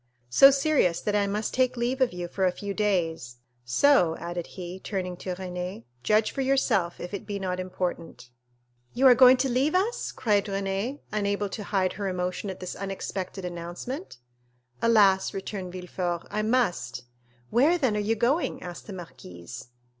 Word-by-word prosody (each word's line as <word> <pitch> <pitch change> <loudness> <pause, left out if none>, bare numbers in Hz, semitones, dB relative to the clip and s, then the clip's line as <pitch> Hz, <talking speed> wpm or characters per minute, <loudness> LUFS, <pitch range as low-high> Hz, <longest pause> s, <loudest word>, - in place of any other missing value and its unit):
"So 275 - +9
serious 275 - +2
that 210 - -1
I 200 -1 +2
must 210 +2 -2
take 255 -1 +1
leave 245 +3 -1
of 255 - +3
you 175 -1 -5
for 190 +2 -3
a - - +2
few 200 +2 -5
days; 165 - -1 0.3
so," 170 - +3
added 175 0 -5
he, 180 0 -6
turning 185 -2 -4
to 185 0 -4
Renée, 180 -6 -5 0.2
"judge 215 - +2
for 275 - -3
yourself 260 -10 +1
if 180 - -7
it 200 - -5
be 205 -1 -3
not 185 -2 -3
important." 175 -8 -5 0.6
"You 265 - +2
are 255 - +10
going 255 +1 +7
to 260 +2 +1
leave 265 +6 +1
us?" 410 +6 0
cried 210 -5 +1
Renée, 195 +7 -2
unable 205 -1 -1
to 205 +2 -6
hide 190 -3 0
her 200 -2 -4
emotion 180 +2 -2
at 190 - -6
this 185 - -6
unexpected 195 -1 -5
announcement. 175 - -6 0.6
"Alas," 200 -5 +4
returned 190 -1 -5
Villefort, 180 -1 -4
"I 210 +1 0
must!" 215 - 0 0.5
"Where, 295 +9 +4
then, 260 -10 +1
are - - 0
you 210 +2 +1
going?" 250 +9 +1
asked 175 -1 -8
the 205 - -7
marquise. 90 - -10
195 Hz, 170 wpm, -27 LUFS, 180-235 Hz, 0.6 s, are